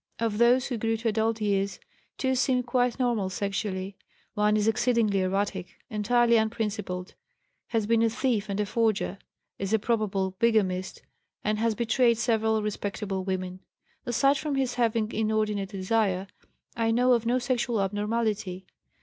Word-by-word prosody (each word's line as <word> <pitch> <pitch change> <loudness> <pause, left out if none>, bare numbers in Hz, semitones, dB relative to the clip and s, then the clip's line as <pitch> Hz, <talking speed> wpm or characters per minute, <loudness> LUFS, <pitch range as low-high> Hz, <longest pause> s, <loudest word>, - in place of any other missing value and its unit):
Of 225 -2 -1
those 245 +2 +5
who 245 -4 -3
grew 225 +1 0
to 225 +1 -1
adult 220 +1 0
years, 200 -1 0 0.4
2 260 -1 0
seem 255 0 +2
quite 245 0 +1
normal 235 -7 0
sexually; 195 0 -3 0.4
1 210 0 +2
is 210 0 +1
exceedingly 225 -3 +2
erratic, 190 0 -2 0.2
entirely 235 +2 +3
unprincipled, 210 -5 -2 0.5
has 225 -3 0
been 230 +1 +3
a 230 - +4
thief 225 -3 -1
and 200 +1 -2
a 210 - +1
forger, 215 -2 0 0.4
is 195 +2 -2
a - - +6
probable 205 -4 0
bigamist, 195 -5 +1 0.4
and 210 0 0
has 225 -1 +1
betrayed 235 0 +2
several 220 -1 +1
respectable 200 -2 -3
women. 185 -1 -3 0.4
Aside 275 +4 +2
from 300 -2 -2
his 265 -2 0
having 230 -2 0
inordinate 215 -2 0
desire, 195 -1 0 0.5
I 230 -1 +1
know 250 +2 +4
of 230 -1 +1
no 245 +2 +3
sexual 245 -2 0
abnormality. 205 -2 -1
220 Hz, 150 wpm, -27 LUFS, 200-235 Hz, 0.5 s, a